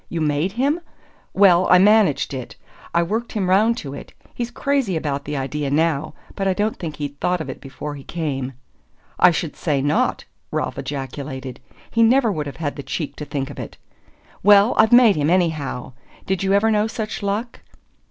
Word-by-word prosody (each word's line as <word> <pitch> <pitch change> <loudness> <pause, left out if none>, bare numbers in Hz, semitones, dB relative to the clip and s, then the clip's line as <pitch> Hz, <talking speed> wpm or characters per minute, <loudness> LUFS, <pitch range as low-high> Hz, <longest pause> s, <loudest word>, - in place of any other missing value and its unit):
You 170 - -3
MADE 155 +4 0
him?" 280 +8 +1 0.5
"Well, 185 -2 +5
I 180 - +8
managed 200 -7 +4
it, 130 -2 -6 0.4
I 170 - +2
worked 220 +7 -3
him 200 -4 -1
round 220 +5 +4
to 140 - -6
it! - - -10 0.2
He's 240 -1 -3
crazy 265 -6 0
about 140 -3 -3
the 150 0 -3
idea 140 +1 -2
now 155 0 0 0.2
but 195 -1 -1
I 190 - +3
don't 210 +3 -1
think 160 -4 -5
he'd 145 -1 -6
thought 180 0 0
of 160 - -4
it - - -11
before 145 +2 -7
he 140 -2 -9
came." 135 -6 -3 0.7
"I 180 - +8
should 165 -2 -2
say 145 -4 0
not!" 145 +3 0 0.2
Ralph - - -3
ejaculated. 135 -2 -6 0.3
"He 230 - +2
never 235 0 +4
would 150 -5 -3
have 140 - -8
had 155 -3 -3
the - - -4
cheek 150 +2 -4
to 150 - -6
think 140 -1 -4
of - - -10
it." - - -8 0.6
"Well, 205 +3 +6
I've 220 0 +4
made 240 -6 +7
him, 150 +1 +1
anyhow! 160 -8 0 0.3
Did 190 0 -1
you 195 0 +1
ever 215 +3 +3
know 210 0 +2
such 220 -1 -5
luck?" 210 +4 -3
170 Hz, 190 wpm, -21 LUFS, 145-210 Hz, 0.7 s, I